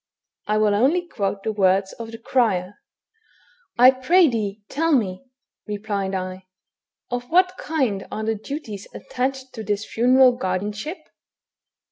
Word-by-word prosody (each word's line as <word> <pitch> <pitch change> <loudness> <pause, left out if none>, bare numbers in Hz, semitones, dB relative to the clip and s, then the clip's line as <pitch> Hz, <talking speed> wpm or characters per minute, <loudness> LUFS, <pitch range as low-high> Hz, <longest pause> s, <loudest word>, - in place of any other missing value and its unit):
I 210 +1 +1
will 215 -1 +3
only 295 +12 +2
quote 200 - -3
the 220 - -1
words 195 -1 +2
of 230 -1 -8
the 225 - -8
crier: 215 -6 0 0.4
— 445 0 -36
" - - -35
I 250 +2 +8
pray 320 +8 +4
thee, 210 -4 -3
tell 325 +3 0
me," 205 -5 0 0.4
replied 205 -2 -3
I, 185 0 -5 0.6
"of 245 0 -2
what 365 +2 +3
kind 260 -11 -1
are 220 - -4
the 220 +1 0
duties 220 -3 -7
attached 260 +1 -3
to 220 - -6
this 210 +1 -2
funeral 255 +2 +5
guardianship?" 210 - -3
220 Hz, 145 wpm, -23 LUFS, 200-265 Hz, 0.6 s, I